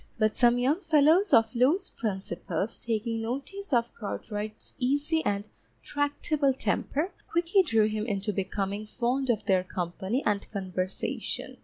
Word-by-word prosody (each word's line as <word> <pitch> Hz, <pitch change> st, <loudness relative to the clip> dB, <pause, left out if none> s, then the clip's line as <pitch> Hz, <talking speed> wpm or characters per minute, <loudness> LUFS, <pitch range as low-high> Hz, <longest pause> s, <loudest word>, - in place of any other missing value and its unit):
But 215 Hz, -1 st, +2 dB
some 240 Hz, -1 st, +5 dB
young 275 Hz, +9 st, +2 dB
fellows 320 Hz, +4 st, +4 dB
of 225 Hz, -3 st, +5 dB
loose 290 Hz, +11 st, +3 dB
principles 190 Hz, -2 st, -3 dB
taking 225 Hz, 0 st, -2 dB
notice 280 Hz, -, -5 dB
of 240 Hz, -2 st, +2 dB
Cartwright's 210 Hz, 0 st, -6 dB
easy 290 Hz, +5 st, +1 dB
and 205 Hz, +1 st, -1 dB, 0.4 s
tractable 290 Hz, -1 st, 0 dB
temper, 305 Hz, +6 st, -1 dB, 0.2 s
quickly 340 Hz, +3 st, +3 dB
drew 225 Hz, -, +3 dB
him 215 Hz, +1 st, -2 dB
into 205 Hz, -1 st, -1 dB
becoming 200 Hz, +2 st, -2 dB
fond 255 Hz, +4 st, -1 dB
of 220 Hz, -4 st, +1 dB
their 185 Hz, -2 st, +3 dB
company 185 Hz, +7 st, -2 dB
and 205 Hz, -1 st, 0 dB
conversation. 185 Hz, -2 st, -3 dB
235 Hz, 135 wpm, -28 LUFS, 205-285 Hz, 0.4 s, some